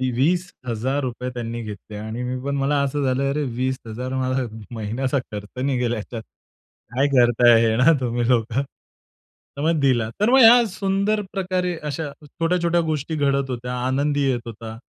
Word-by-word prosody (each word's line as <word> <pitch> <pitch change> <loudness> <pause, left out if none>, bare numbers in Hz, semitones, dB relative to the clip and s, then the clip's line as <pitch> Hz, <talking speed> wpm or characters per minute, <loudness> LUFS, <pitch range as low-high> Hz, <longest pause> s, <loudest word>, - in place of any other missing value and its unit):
₹20,000 130 -5 -1
त्यांनी 120 -1 -4
घेतले 105 0 -8
आणि 110 +3 -5
मी 125 +1 -3
पण 140 0 -2
मला 140 +1 +1
असं 140 +1 -1
झालं, 135 +1 +1
"अरे 150 +2 -1
₹20,000 130 0 -2
मला 130 -1 0 0.3
महिन्याचा 120 +6 -1
खर्च 105 +4 -7
निघेल 125 -4 0
ह्याच्यात. 115 0 -5 0.7
काय 135 +2 +3
करताय 120 -3 +5
हे 110 -1 +2
ना 130 +7 +6
तुम्ही 120 -2 -1
लोकं?" 120 +1 +2 1.0
तर 140 - -3
मग 160 0 +2
दिला. 125 -5 +2
तर 210 - +3
मग 265 +1 +6
या 235 +1 +8
सुंदर 200 +2 0
प्रकारे 180 -2 -1
अशा 150 +1 -3 0.2
छोट्या-छोट्या 170 +2 0
गोष्टी 155 +1 -2
घडत 140 -2 +1
होत्या, 125 0 -4
आनंदही 140 +2 +1
येत 120 -2 -2
होता 110 0 -8
130 Hz, 155 wpm, -22 LUFS, 120-150 Hz, 1.0 s, या